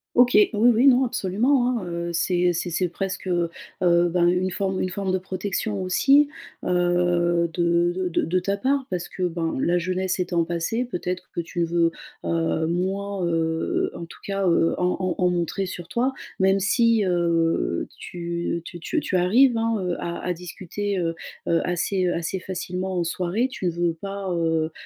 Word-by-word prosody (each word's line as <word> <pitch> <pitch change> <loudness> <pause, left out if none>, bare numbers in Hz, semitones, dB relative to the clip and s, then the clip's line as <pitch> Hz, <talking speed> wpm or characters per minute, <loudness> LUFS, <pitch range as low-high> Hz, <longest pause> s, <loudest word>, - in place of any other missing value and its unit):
OK, 245 0 +6
oui 415 -3 +6 0.2
oui, 245 +5 +4
non, 260 0 +6
absolument, 245 +5 +1
hein, 190 - -6
heu, 170 0 -3
c'est 175 +1 +2
c'est 175 +1 -2
c'est 175 +1 0
presque, 195 +2 -4
heu, 175 -2 +1 0.3
heu, 175 -1 +4
ben, 175 0 +2
une 180 +1 +1
forme 190 0 -1
une 185 - -1
forme 190 0 -2
de - - +3
protection 190 +2 -3
aussi, 275 +11 +4 0.4
heu, 175 -1 +2
de 170 0 +2
de 185 -1 -1
de 170 - +1
de 180 +2 +1
ta 195 +2 -1
part, 270 +5 0
parce 180 -2 -3
que, 185 - -5
ben, 170 -2 -1
la 175 +1 +2
jeunesse 185 +2 -1
étant 175 -2 +1
passée, 175 +8 -1
peut-être 180 -6 -4
que - - -3
tu 170 +1 -2
veux, 170 0 +2 0.3
heu, 165 -1 0
moins, 190 +2 -1
heu, 165 -1 0
en - - -6
tout 165 - -14
cas, 195 -1 -1
heu, 165 -1 +3
en 180 0 +1
en 185 -1 -1
en 180 -1 +3
montrer 175 +2 -1
sur 175 -2 -7
toi. 250 +7 0 0.3
Même 190 +1 +4
si, 230 +2 +3
heu, 165 - +1
tu 170 -1 -4
tu 175 - -8
tu 320 - -1
tu 200 - -3
arrives, 230 +8 +4
hein, 225 0 +1
heu, 180 -1 -1
à 170 0 -4
à 180 - -2
discuter, 185 +3 -4
heu, 165 -1 -1 0.3
heu, 170 - +3
assez, 180 +2 0
heu, 175 - +1
assez 170 +3 -2
facilement 185 0 -4
en 170 - 0
soirée, 180 +8 0
tu 185 -8 -2
veux 170 0 0
pas, 195 +3 -6
heu, 165 -1 0
180 Hz, 185 wpm, -24 LUFS, 170-195 Hz, 0.4 s, OK